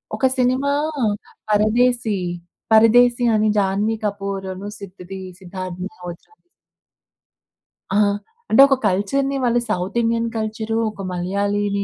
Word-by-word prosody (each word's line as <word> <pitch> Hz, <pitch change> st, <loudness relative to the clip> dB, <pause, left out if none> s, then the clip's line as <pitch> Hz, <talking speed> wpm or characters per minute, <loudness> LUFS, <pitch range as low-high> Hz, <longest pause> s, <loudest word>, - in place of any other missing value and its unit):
ఒక -, -, 0 dB
సినిమా 255 Hz, +3 st, +2 dB, 0.8 s
"పరదేశి", 220 Hz, +1 st, +2 dB, 0.5 s
"పరదేశి" 240 Hz, +2 st, +5 dB
అని 215 Hz, 0 st, +2 dB
జాన్వీ‌కపూర్‌ 200 Hz, -1 st, -1 dB
అను 195 Hz, +2 st, -7 dB
సిద్‌దీ 190 Hz, -1 st, -9 dB, 0.2 s
సిద్ధార్థ్ 185 Hz, -1 st, -7 dB
మల్హోత్రా‌ 180 Hz, -, -10 dB, 1.6 s
ఆ! -, -, +4 dB, 0.5 s
అంటే 265 Hz, -, +6 dB
ఒక 275 Hz, -, +3 dB
కల్చర్‌ని, 270 Hz, +9 st, 0 dB
వాళ్ళు 240 Hz, -1 st, +2 dB
సౌత్ 190 Hz, +2 st, -2 dB
ఇండియన్ 230 Hz, 0 st, 0 dB
కల్చరు, 220 Hz, +1 st, -2 dB
ఒక 205 Hz, -, -10 dB
మలయాళీని 200 Hz, +3 st, -1 dB
210 Hz, 100 wpm, -21 LUFS, 195-235 Hz, 1.6 s, అంటే